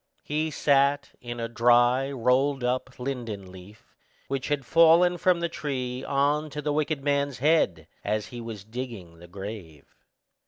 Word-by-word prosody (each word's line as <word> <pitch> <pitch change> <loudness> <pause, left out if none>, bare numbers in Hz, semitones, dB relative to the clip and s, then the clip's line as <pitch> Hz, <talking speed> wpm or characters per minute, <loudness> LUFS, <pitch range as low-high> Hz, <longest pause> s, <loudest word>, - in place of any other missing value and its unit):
He 155 +2 -1
sat 140 -1 +2
in 120 -1 -6
a 115 - -2
dry 120 +3 +3
rolled 135 +2 +1
up 130 +1 -2
linden 115 -7 -5
leaf, 95 +4 -15 0.4
which 135 -1 -2
had 145 -3 -1
fallen 170 +4 +5
from 180 -1 +2
the 170 - +1
tree 130 -6 -4
on 145 +2 +1
to 150 - -6
the 150 0 -1
wicked 150 -1 -1
man's 140 -1 0
head, 130 - +2 0.2
as 105 0 -1
he 120 - -6
was 110 -4 -7
digging 110 -7 -8
the 85 - -13
grave. 95 -6 -9
130 Hz, 155 wpm, -26 LUFS, 115-145 Hz, 0.4 s, fallen